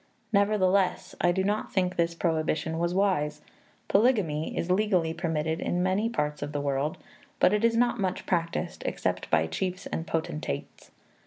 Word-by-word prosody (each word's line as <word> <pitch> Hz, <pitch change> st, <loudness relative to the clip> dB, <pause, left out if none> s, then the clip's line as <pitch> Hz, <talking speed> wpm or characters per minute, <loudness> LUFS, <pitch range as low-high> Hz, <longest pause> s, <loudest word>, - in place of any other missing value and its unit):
Nevertheless, 200 Hz, -2 st, +2 dB
I 175 Hz, -, +4 dB
do 190 Hz, +2 st, 0 dB
not 205 Hz, +2 st, -1 dB
think 185 Hz, -2 st, 0 dB
this 170 Hz, 0 st, +1 dB
prohibition 160 Hz, -1 st, 0 dB
was 170 Hz, 0 st, +1 dB
wise. 180 Hz, -6 st, +1 dB, 0.5 s
Polygamy 195 Hz, -, +2 dB
is 175 Hz, -, -1 dB
legally 185 Hz, -5 st, +2 dB
permitted 160 Hz, -2 st, -1 dB
in 175 Hz, 0 st, 0 dB
many 195 Hz, +5 st, +1 dB
parts 150 Hz, -10 st, -2 dB
of 145 Hz, +1 st, -4 dB
the 145 Hz, -, -1 dB
world, 140 Hz, +1 st, -1 dB, 0.4 s
but 185 Hz, -, +5 dB
is 230 Hz, 0 st, +3 dB
not 240 Hz, -1 st, +2 dB
much 185 Hz, -2 st, -2 dB
practised 170 Hz, -2 st, -1 dB
except -, -, -2 dB
by 80 Hz, -, +3 dB
chiefs 185 Hz, -, -3 dB
and 165 Hz, -, -4 dB
potentates. 155 Hz, -, -4 dB
175 Hz, 155 wpm, -28 LUFS, 160-195 Hz, 0.5 s, but